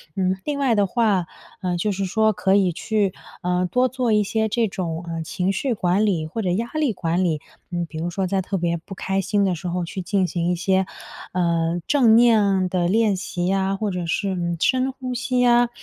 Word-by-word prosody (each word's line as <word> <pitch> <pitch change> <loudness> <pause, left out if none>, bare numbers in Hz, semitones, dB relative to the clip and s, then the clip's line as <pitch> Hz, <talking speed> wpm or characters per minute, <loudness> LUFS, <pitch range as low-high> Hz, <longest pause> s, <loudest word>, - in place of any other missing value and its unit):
嗯， 185 -1 0
另 295 -1 -2
外 265 -5 +2
的 205 -1 +3
话， 200 -5 +1 0.3
嗯， 180 -1 -1
就 205 +5 0
是 195 0 -2
说 220 +3 +2
可 190 0 +2
以 190 -3 +3
去， 205 +2 -1 0.3
呃， 180 0 0
多 250 +1 +3
做 255 -2 -1
一 210 -1 +4
些 220 +2 0
这 230 +1 +1
种， 170 -3 -4
呃， 165 -1 -3
情 180 +4 -1
绪 260 +4 -1
管 190 0 +1
理 175 -7 0
或 180 +9 -4
者 190 - -1
压 225 +6 -1
力 310 -5 +1
管 175 0 0
理。 160 -4 0 0.3
嗯， 175 -1 -1
比 160 -1 -8
如 170 +2 -2
说 190 +2 -2
在 190 +1 0
特 195 +1 -3
别 170 -1 0
不 190 +4 -10
开 195 +1 -1
心 200 +1 +1
的 190 - +1
时 175 +2 -5
候 175 0 -2
去 185 +2 -5
进 190 +1 +1
行 175 -1 -1
一 - - +1
些， 190 +2 +1 0.5
呃， 170 -1 +1
正 250 -7 +5
念 230 -2 +6
啊 190 -2 +2
的 180 -1 0
练 215 +1 +2
习 180 -1 -3
呀 195 +1 +1
或 205 +1 -2
者 180 -2 -3
是， 200 +4 0
嗯， 170 -2 -2
深 260 +5 +2
呼 255 -1 -6
吸 250 +1 -1
呀， 240 -1 +4
190 Hz, 245 characters per minute, -22 LUFS, 175-220 Hz, 0.5 s, 念